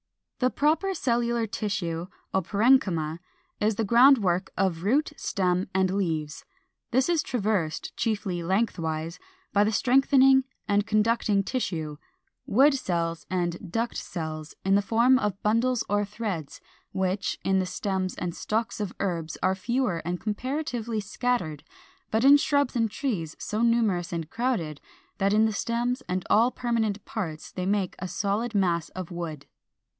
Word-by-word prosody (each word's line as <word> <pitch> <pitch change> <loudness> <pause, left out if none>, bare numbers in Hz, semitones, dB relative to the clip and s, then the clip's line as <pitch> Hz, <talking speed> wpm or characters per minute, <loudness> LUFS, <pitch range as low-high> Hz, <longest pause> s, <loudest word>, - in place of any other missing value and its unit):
] - - -58
409. 255 - +3
The - - -19
proper 320 +7 +2
cellular 235 -3 0
tissue, 180 -6 -3 0.3
or 190 - +3
parenchyma, 190 -6 +2 0.4
is 210 0 +1
the 225 - 0
ground 245 +6 +7
work 185 -3 0
of 185 -4 0
root, 280 - +1
stem, 185 -6 0
and 190 -1 +2
leaves; 160 -6 -2 0.5
this 260 +2 +2
is 340 -3 +2
traversed, 205 - -2
chiefly 200 -5 -1
lengthwise, 165 -4 -1 0.3
by 205 0 +5
the 210 - +1
strengthening 265 +3 +5 0.2
and 205 0 +2
conducting 215 -1 +2
tissue, 165 - -3 0.5
wood 275 +7 +5
cells 170 -10 -2
and 175 0 -2
duct 230 +4 -1
cells, 155 -2 -5
in 195 - +3
the 200 - +5
form 235 +5 +4
of 205 -4 -2
bundles 230 +3 +2
or 205 +1 +1
threads, 205 -7 -5 0.3
which, 190 +1 -1
in 190 0 +2
the 185 - -1
stems 190 -1 -2
and 175 -1 -3
stalks 220 +6 -2
of 205 -3 -4
herbs 170 -5 -2
are 185 - +3
fewer 205 -2 -1
and 175 +2 -3
comparatively 235 0 -3
scattered, 210 - -2 0.5
but 220 +2 +1
in 285 +1 +9
shrubs 285 -3 +1
and 230 -2 +2
trees 200 - -3
so 215 +1 -3
numerous 225 -7 +2
and 165 -2 -4
crowded 225 - -2 0.4
that 195 +1 +2
in 215 +1 +5
the 220 - 0
stems 240 +4 -1
and 185 0 -1
all 230 +3 +5
permanent 230 -5 -1
parts 160 -8 -5
they 185 0 -3
make 200 -2 0
a 185 - -4
solid 210 +5 -1
mass 175 -5 +1
of 185 -2 -7
wood. 165 -4 -5
205 Hz, 155 wpm, -27 LUFS, 180-235 Hz, 0.5 s, in